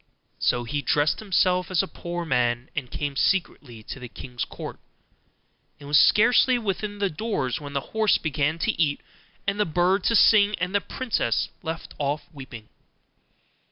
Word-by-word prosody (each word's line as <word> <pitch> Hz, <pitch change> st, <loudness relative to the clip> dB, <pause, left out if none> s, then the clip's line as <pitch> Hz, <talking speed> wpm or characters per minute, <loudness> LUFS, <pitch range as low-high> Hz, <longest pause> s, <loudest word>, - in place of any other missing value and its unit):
So 120 Hz, -, +1 dB
he 145 Hz, +5 st, -3 dB
dressed 145 Hz, +1 st, +1 dB
himself 185 Hz, -3 st, +1 dB
as 185 Hz, 0 st, +2 dB
a -, -, -5 dB
poor 175 Hz, -1 st, -5 dB
man, 120 Hz, -3 st, 0 dB
and 135 Hz, -4 st, -3 dB
came 145 Hz, -2 st, -4 dB
secretly 130 Hz, -, -1 dB
to 135 Hz, -, -8 dB
the 125 Hz, -1 st, -8 dB
king's 125 Hz, 0 st, -6 dB
court, -, -, -8 dB, 1.0 s
and 145 Hz, -, -11 dB
was 145 Hz, +1 st, +5 dB
scarcely 245 Hz, +3 st, +5 dB
within 205 Hz, -1 st, -3 dB
the 200 Hz, -1 st, +1 dB
doors 155 Hz, -, -2 dB
when 145 Hz, -1 st, -8 dB
the 140 Hz, -, 0 dB
horse 220 Hz, -1 st, +3 dB
began 150 Hz, 0 st, -1 dB
to 225 Hz, -, +3 dB
eat, 145 Hz, -3 st, +1 dB, 0.4 s
and 200 Hz, +1 st, -1 dB
the 210 Hz, -, +3 dB
bird 180 Hz, +4 st, +1 dB
to 230 Hz, -, +3 dB
sing, 210 Hz, -1 st, +6 dB
and 180 Hz, +2 st, -2 dB
the 205 Hz, -, +2 dB
princess 250 Hz, +3 st, -1 dB
left 165 Hz, -1 st, -6 dB
off 145 Hz, +1 st, -1 dB
weeping. 130 Hz, -6 st, -10 dB
165 Hz, 165 wpm, -25 LUFS, 140-200 Hz, 1.0 s, sing